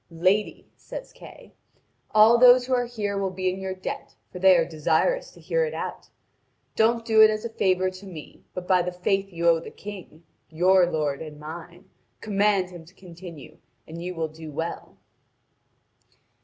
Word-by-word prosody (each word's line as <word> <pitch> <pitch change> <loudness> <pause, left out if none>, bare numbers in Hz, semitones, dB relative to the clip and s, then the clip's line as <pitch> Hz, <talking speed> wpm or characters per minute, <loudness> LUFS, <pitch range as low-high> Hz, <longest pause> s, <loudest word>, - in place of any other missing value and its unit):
"Lady," 185 +5 0
says - - -9
Kay, - - -14 0.6
"all 220 +2 +6
those 250 0 +7
who 260 - -2
are 245 -1 +1
here 205 -4 -3
will 195 -1 -1
be 185 0 -3
in 185 +1 -4
your 190 0 -4
debt, 185 - -7 0.2
for 180 - -8
they 190 -1 +6
are 165 - +2
desirous - - 0
to - - -18
hear - - 0
it 475 - -3
out. - - -6 0.7
Don't 230 +1 +2
do 220 -1 +5
it 220 - +9
as 215 +1 -3
a - - -3
favour 185 -3 +1
to 185 +2 -12
me! 165 -5 -11
But 180 -1 -6
by 185 -1 +4
the 180 +1 -3
faith 195 +2 -1
you 170 -1 -1
owe 165 -1 +5
the 165 - -9
King, 190 -6 -11 0.3
your 180 +2 +4
lord 150 -3 -1
and 150 -2 -9
mine, 170 +4 -10 0.3
command 200 -3 +1
him 175 -2 -10
to 180 +4 -20
continue, 170 -5 -12 0.3
and 165 +1 -8
you 180 +1 -5
will 165 -1 -2
do 155 0 -10
well." 165 +3 -6
185 Hz, 185 wpm, -25 LUFS, 170-210 Hz, 0.7 s, it